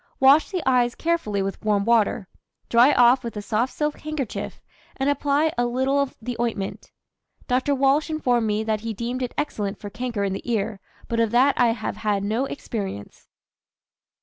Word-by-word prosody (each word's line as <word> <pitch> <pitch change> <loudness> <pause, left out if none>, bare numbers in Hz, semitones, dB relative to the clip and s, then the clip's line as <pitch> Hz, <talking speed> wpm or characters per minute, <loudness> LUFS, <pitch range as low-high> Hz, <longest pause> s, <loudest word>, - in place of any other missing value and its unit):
Wash 275 +4 +6
the 365 -8 -3
eyes 245 -2 +3
carefully 265 -13 -1
with 195 +2 -5
warm 205 -2 +1
water, 220 -4 +2 0.4
dry 240 +4 +6
off 250 +1 +5
with 230 -3 -6
a - - -3
soft 225 +5 0
silk 300 0 -2
handkerchief, 305 -6 -5 0.4
and 275 +1 +1
apply 285 +2 +1
a 245 - +2
little 265 +3 +1
of 280 - -3
the 245 +2 -5
ointment. 225 -5 -3 0.6
Dr. 260 +3 +1
Walsh 275 +4 +2
informed 245 -7 +1
me 210 +1 0
that 220 -1 -1
he 225 -1 -4
deemed 240 +4 -3
it 250 - -4
excellent 210 -9 -2
for 205 - -8
canker 230 -1 -3
in 195 -1 -1
the 215 +5 -5
ear, 210 -2 -1 0.3
but 230 - -1
of 230 -1 +2
that 255 +5 +4
I 240 -2 +3
have 220 -2 -5
had 205 -2 -1
no 220 +6 0
experience. 200 - -6
240 Hz, 180 wpm, -24 LUFS, 215-270 Hz, 0.6 s, Wash